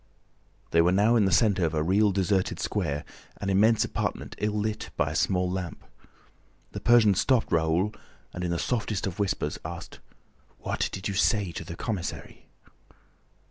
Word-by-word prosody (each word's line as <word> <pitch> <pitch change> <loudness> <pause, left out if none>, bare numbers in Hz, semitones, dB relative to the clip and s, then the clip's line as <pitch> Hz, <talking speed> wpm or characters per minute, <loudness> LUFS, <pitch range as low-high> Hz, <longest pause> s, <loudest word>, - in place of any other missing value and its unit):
They 85 - +5
were 85 +2 +3
now 105 +5 +4
in 110 -4 +4
the 95 - +1
center 95 +1 +3
of 80 -1 0
a 75 - +1
real 100 +5 +3
deserted 95 0 0
square, 70 +1 -2 0.3
an 100 -1 -2
immense 110 +4 +4
apartment - - -3
ill 105 +1 0
lit 110 +1 -2
by - - +1
a - - -5
small 90 -1 +1
lamp. 90 -2 -5 0.9
The - - -5
Persian 120 -4 +5
stopped 120 +5 +1
Raoul 85 +6 +1 0.4
and, 90 - -5
in 90 - -1
the 85 - 0
softest 105 -1 -1
of 95 +1 -5
whispers, 95 -7 -1
asked: - - -8 0.6
"What - - -2
did 95 - -4
you 100 - -2
say 100 -1 +2
to 85 - -6
the 85 +1 -8
commissary?" 95 -2 -5
95 Hz, 170 wpm, -27 LUFS, 85-105 Hz, 0.9 s, They